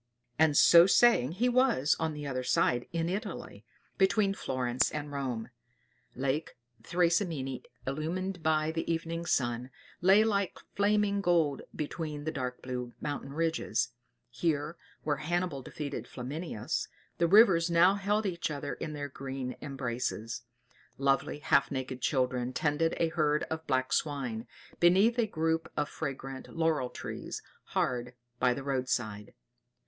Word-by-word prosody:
And 155 -2 +5
so 170 +1 +8
saying 195 - +5
he 230 +7 +1
was 245 - +3
on 160 -1 -1
the 150 0 -6
other 130 -2 -2
side 125 -1 +2
in 165 -1 -1
Italy, 185 - -5 0.4
between 195 +1 +3
Florence 130 -6 0
and 145 -1 -5
Rome. 125 -5 -3 0.6
Lake 135 +4 -2 0.2
Thracymene, 170 - 0 0.2
illumined 170 +6 -3
by 155 0 +2
the 165 +1 -2
evening 165 +1 -3
sun, 120 -3 0 0.3
lay 195 +4 +6
like 200 -4 0 0.2
flaming 205 0 +2
gold 165 -6 +2
between 150 -1 -4
the 155 - -2
dark 125 -4 -4
blue 125 -1 -4
mountain 145 -2 -4
ridges; 165 +1 0 0.4
here, 160 0 -1 0.3
where 145 -2 0
Hannibal 165 -1 -1
defeated 140 +2 -5
Flaminius, 135 -2 -4 0.3
the 170 - +4
rivers 180 -3 +6
now 170 +3 +6
held 205 +2 0
each 175 -4 -1
other 145 -1 -4
in 155 - -5
their 145 -1 -4
green 135 -2 -5
embraces; 120 -4 -3 0.6
lovely, 135 +1 +1
half 140 -1 +3
naked 130 -2 -4
children 125 -2 0
tended 155 +3 +1
a 165 - +2
herd 150 -2 +1
of 160 0 -4
black 130 -1 +1
swine, 125 -6 -1 0.3
beneath 195 +8 +5
a 230 - +3
group 160 -3 -1
of 150 -1 +1
fragrant 135 -3 -5
laurel 160 -6 +1
trees, - - -6 0.2
hard 125 0 -1 0.2
by 125 - +4
the 135 +3 -3
road 130 -2 -1
side. 110 -5 -2
150 Hz, 140 wpm, -30 LUFS, 130-170 Hz, 0.6 s, so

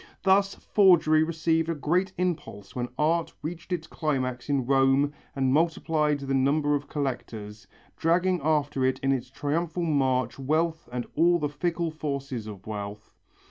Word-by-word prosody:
Thus 195 +1 +3
forgery 170 -6 +4
received 165 0 +1
a 165 - 0
great 175 +6 0
impulse 150 - -3
when 125 -1 -2
art 165 +2 +1
reached 170 +3 -6
its 170 -3 -2
climax 130 -6 -2
in 140 -3 +1
Rome 135 +2 +3 0.2
and 130 -1 +1
multiplied 155 -2 +1
the 135 0 -2
number 145 +3 +2
of 145 0 -1
collectors, 110 -7 -5 0.3
dragging 180 +2 +2
after 150 -3 +1
it 130 0 +2
in 135 - +2
its 130 -2 -1
triumphal 160 +5 -2
march 130 -6 +1
wealth 160 +1 0
and 125 -1 -3
all 175 +3 +4
the 150 -3 -1
fickle 170 +2 -2
forces 140 -6 -4
of 100 -2 -9
wealth. 105 -1 -6
145 Hz, 150 wpm, -27 LUFS, 130-165 Hz, 0.3 s, forgery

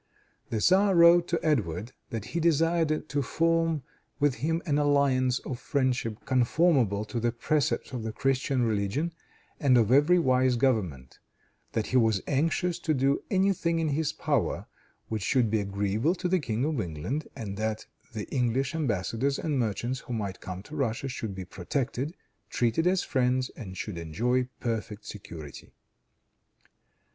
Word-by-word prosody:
The 115 - -1
tzar 190 - +4
wrote 170 0 +7
to 170 - 0
Edward 110 - 0 0.2
that 115 -2 -4
he 170 - 0
desired 165 -1 +2
to 145 -2 -1
form 165 +1 +1 0.4
with 145 -2 +3
him 165 +6 -1
an 150 -3 +1
alliance 140 -3 +3
of 125 -3 -4
friendship 125 -6 -1
conformable 130 - +2
to 120 +2 -3
the 120 +1 +1
precepts 140 +5 0
of 125 - -3
the 110 0 -3
Christian 135 +2 0
religion 110 - 0 0.5
and 130 -4 +4
of 115 -1 +3
every 145 +7 +5
wise 130 -5 +3
government; 95 - -1 0.5
that 110 - 0
he 130 - +1
was 110 -5 +3
anxious 165 +5 0
to 160 -3 0
do 135 +1 +2
any 195 0 +3
thing 170 -2 -1
in 160 -1 0
his 150 +1 0
power 150 -5 -1 0.4
which 110 -2 -3
should 120 +1 +2
be 110 - +2
agreeable 100 - 0
to 180 - -2
the 185 +1 +2
King 120 -3 -1
of 150 -6 0
England, 90 - -4
and 100 -3 -5
that 110 0 -2 0.3
the 110 -3 -5
English 130 +1 0
embassadors 135 - -1
and 150 -4 -1
merchants 120 +3 -1
who 125 - -7
might 100 -5 -4
come 95 0 -6
to 145 - -10
Russia 135 -2 -1
should 110 -6 -5
be 95 -1 -6
protected, 130 - -3 0.3
treated 120 +8 +1
as 185 0 +2
friends 130 0 +1
and 95 -6 -8
should 95 -4 -5
enjoy 120 +11 0
perfect 110 -3 -3
security. 85 -8 -10
130 Hz, 160 wpm, -28 LUFS, 110-155 Hz, 0.5 s, wrote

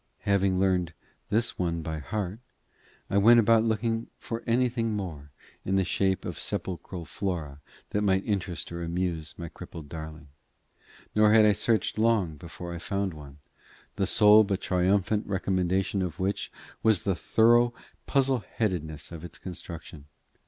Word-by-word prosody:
Having 100 -2 +2
learnt 90 -3 +1 0.4
this 115 +2 0
one 85 -2 -1
by 80 0 -4
heart, 100 +6 -4 0.7
I 100 - +2
went 115 +4 +7
about 115 0 +5
looking 115 0 0
for 115 0 -5
anything 115 -1 +1
more 80 -9 -5 0.3
in 95 - 0
the 95 - +3
shape 95 +1 0
of - - -5
sepulchral 90 -1 -4
flora 80 -6 -4 0.3
that 105 - 0
might 95 -2 +2
interest 95 -5 -2
or 85 0 -5
amuse 85 -2 -3
my 85 - -6
crippled 80 -1 -10
darling; 80 -1 -8 0.8
nor 105 0 +5
had 110 -1 +7
I 105 - +5
searched 110 +1 +1
long 110 -8 +2
before 85 +3 -8
I 85 - -5
found 100 +1 -2
one, 75 -2 -11 0.6
the 100 -2 0
sole 105 0 +7
but 100 -2 -1
triumphant 95 +3 +1
recommendation 95 0 0
of 90 -3 -4
which 95 +2 -1 0.3
was 110 -5 +3
the 100 - +1
thorough 120 +6 +4 0.4
"puzzle 135 -2 +2 0.2
headedness" 80 -9 -2
of 85 -1 -8
its 85 -2 -8
construction. 85 -4 -8
95 Hz, 150 wpm, -28 LUFS, 85-105 Hz, 0.8 s, went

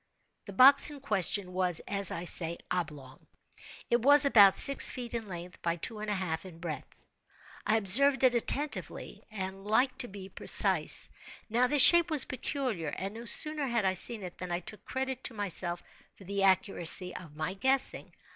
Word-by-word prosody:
The 200 - -12
box 270 +8 +5
in 295 -1 -12
question 200 -6 -1
was, 180 -2 -2
as 200 -2 +3
I 170 +2 -7
say, 170 -1 -1
oblong. 145 -6 -8 0.6
It 240 0 -2
was 285 +3 +4
about 205 -8 +3
six 275 - +7
feet 245 -2 -8
in 230 -2 -7
length 175 -1 -12
by 170 0 -4
two 210 +6 -8
and 215 0 -8
a 210 - -3
half 160 -4 -6
in 180 -4 -14
breadth; 165 -2 -11 0.6
I 220 - 0
observed 265 +8 +5
it 255 -1 +2
attentively, 280 +5 -4
and 195 -2 -9
like 245 +6 -1
to 245 - -2
be 195 -2 -12
precise. - - 0 0.4
Now 245 +3 0
this 290 0 +6
shape 345 0 +8
was 305 -4 +3
peculiar; 255 - -6
and 195 +6 -7
no 230 +2 -12
sooner 305 +3 +4
had 235 -4 -3
I 190 - -1
seen 210 +3 +3
it, 180 -1 -12
than 185 -1 -9
I 175 +1 -5
took 210 +4 -13
credit 265 -1 -7
to 235 - -5
myself 175 -4 -3 0.3
for - - -18
the 200 +1 -6
accuracy 185 -2 -1
of 160 -5 -13
my 155 +4 -6
guessing. 265 +7 -2
200 Hz, 185 wpm, -27 LUFS, 180-255 Hz, 0.6 s, shape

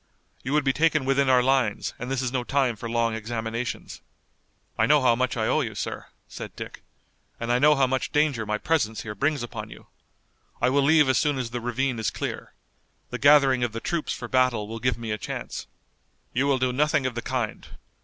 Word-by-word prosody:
You 135 - -3
would 150 -1 +3
be 135 -1 +2
taken 155 -2 +2
within 135 0 +2
our 125 -1 +5
lines 130 -5 +1
and 125 - -5
this 135 -1 -1
is 125 - -1
no 125 -1 -1
time 130 -2 +1
for 115 +2 -6
long 115 -1 +1
examinations." 115 +2 -4 0.7
"I 110 - +2
know 150 +2 +5
how 120 -2 +5
much 125 0 -1
I 110 - 0
owe - - +2
you, - - -4
sir," - - -5 0.2
said - - -8
Dick, - - -8 0.6
"and 115 +1 -2
I 120 - +3
know 150 +2 +6
how 135 -1 +3
much 130 0 -1
danger 150 -6 +1
my 105 0 -1
presence 115 -7 0
here 105 - -5
brings 140 +5 0
upon 110 -3 -6
you. - - -13 0.7
I 125 - +2
will 140 +1 +3
leave 150 +1 +5
as 130 -1 +3
soon 145 -3 +1
as 125 -3 -3
the 120 0 -4
ravine 120 +1 -1
is 110 - 0
clear. - - -5 0.6
The - - -4
gathering 140 -3 +5
of 120 -2 -1
the 115 - -3
troops 170 +5 -2
for - - -5
battle 130 -5 +2
will 115 +1 -6
give 125 +1 0
me 115 -2 -5
a 105 - -2
chance." - - -6 0.7
"You 130 +3 +1
will 140 -2 +3
do 130 -1 0
nothing 150 +1 +2
of 130 - -1
the 120 - -4
kind. 125 -5 -3
125 Hz, 220 wpm, -25 LUFS, 115-140 Hz, 0.7 s, know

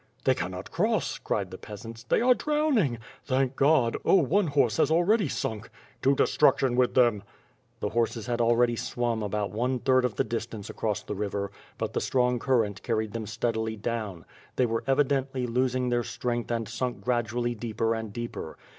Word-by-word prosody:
"They - - +4
cannot - - -5
cross," - - 0
cried - - -2
the - - -8
peasants. 115 +2 -9
"They 115 - +1
are 250 +1 +6
drowning." 280 - +1 0.3
"Thank 130 -1 0
God! 135 -5 +3
Oh, - - +5
one 180 +3 +3
horse 140 -6 +2
has - - +3
already 175 +4 +3
sunk." 110 -4 -3 0.3
"To 135 +2 +4
destruction 135 -3 +3
with 125 0 +2
them." 120 -5 +4 0.6
The 105 - 0
horses 115 0 -1
had 120 -1 -1
already 120 +1 +3
swum 120 -1 -2
about 105 0 -2
one 125 +4 0
third 130 +1 +3
of 125 -4 -1
the - - +2
dis 115 0 -3
tance 105 -4 -8
across 105 -3 -2
the - - -5
river, 100 -1 -3 0.3
but - - -3
the - - 0
strong 125 -1 +1
current 115 -5 +1
carried 110 -2 -1
them 115 -2 -4
steadily 110 0 -1
down. 105 -5 -4 0.3
They 130 - +3
were 115 -1 -1
evidently 135 -1 +1
losing 125 +1 0
their 120 0 +2
strength 120 0 -3
and 115 -2 -1
sunk 120 +3 -3
gradually 120 0 0
deeper 115 0 -1
and 110 -2 -4
deeper. 120 -8 -6
120 Hz, 180 wpm, -27 LUFS, 110-130 Hz, 0.6 s, are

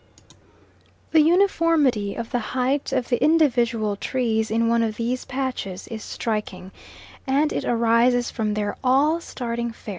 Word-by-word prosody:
The 320 - +6
uniformity 320 - +2
of 230 -1 -6
the 245 - 0
height 255 +5 -1
of 245 - -1
the 245 - +1
individual 240 -9 +2
trees 220 0 -1
in 230 +1 +1
one 235 0 +2
of 220 -2 -1
these 240 +2 -2
patches 250 -8 -4
is 220 -2 -6
striking, 200 -4 -4 0.6
and 285 +3 +1
it - - -3
arises 235 +1 +2
from 215 -2 -2
their 205 -1 -2
all 285 +6 +3
starting 235 -5 -4
fair. 225 - -12
235 Hz, 145 wpm, -23 LUFS, 220-270 Hz, 0.6 s, The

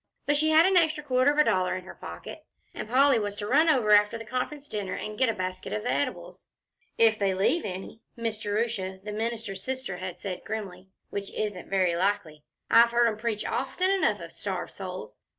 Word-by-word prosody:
But 290 - +2
she 310 +2 +2
had 315 +2 +6
an 380 0 +4
extra 315 -3 +2
quarter 260 0 +3
of 295 - -3
a 300 - +7
dollar 185 -7 +1
in 185 - -5
her - - -9
pocket, - - -9 0.3
and - - -6
Polly 265 0 +5
was 205 -1 -3
to 205 0 -5
run 300 +9 +4
over 245 -8 +3
after 210 +2 +5
the 225 - -9
Conference 265 +5 -4
dinner 205 -7 -3
and 215 - -5
get 255 +2 +2
a - - +1
basket 185 -1 -4
of 210 - -2
the 245 - 0
eatables. 285 - -4 0.5
"If 220 -1 +4
they 195 -2 +1
leave 270 - +2
any," 190 +3 -6
Miss 230 -2 -2
Jerusha, 205 -3 -2
the 210 - -5
minister's 220 -3 -3
sister, 260 -4 -3
had 185 -1 -6
said 185 -3 -5
grimly, 190 -4 -6 0.2
"which 200 -1 -4
isn't 205 -4 -3
very 185 -3 +2
likely. 180 -4 -1 0.3
I've 235 +1 +6
heard 235 0 +3
'em 215 - -4
preach 220 -2 -2
often 370 +1 0
enough 390 -1 +2
of - - -9
starved - - -4
souls. - - -7
215 Hz, 210 wpm, -27 LUFS, 195-255 Hz, 0.5 s, a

